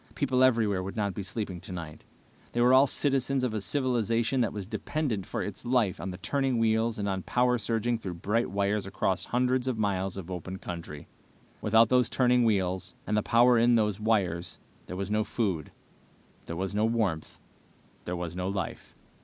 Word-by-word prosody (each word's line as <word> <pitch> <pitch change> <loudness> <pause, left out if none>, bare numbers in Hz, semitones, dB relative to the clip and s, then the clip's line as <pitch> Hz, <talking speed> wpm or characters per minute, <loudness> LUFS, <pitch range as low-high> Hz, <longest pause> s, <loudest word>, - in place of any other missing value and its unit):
People 130 -3 +2
everywhere 110 -7 +3
would 95 +1 -6
not 100 -3 -1
be 100 - -4
sleeping 95 -2 -5
tonight. 80 -4 -8 0.5
They 120 - +1
were 125 +1 +5
all 135 +2 +7
citizens 135 -1 0
of 125 -3 0
a 110 - -2
civilization 120 +2 +1
that 115 - +1
was 100 -2 -5
dependent 115 -2 -3
for - - -3
its - - -6
life 120 -7 +1
on 95 - -4
turning 135 +1 0
wheels 115 0 +1
and 100 -1 -2
on 95 -1 -1
power 125 +4 +1
surging 115 +1 0
through 95 -5 -5
bright 105 +7 0
wires 100 +1 0
across 95 -2 -1
hundreds 125 +1 +1
of 125 -3 -1
miles 95 -3 -1
of 95 -1 -7
open 90 +1 -5
country. 85 -5 -7 0.5
Without 110 +1 +4
those 125 -2 +3
turning 125 -1 +3
wheels, 95 -4 0
and 105 - -1
the 105 - +3
power 120 +2 +4
in 120 +1 +5
those 105 -3 +1
wires 90 -7 0 0.3
there 90 - -6
was 100 +1 -3
no 110 0 +2
food, 95 - -2 0.8
there 85 - -4
was 95 +2 -3
no 105 +1 +1
warmth, 110 -9 -1 0.7
there 90 - -3
was 85 -1 -5
no 90 0 -2
life. 100 -5 -5
105 Hz, 185 wpm, -28 LUFS, 95-120 Hz, 0.8 s, all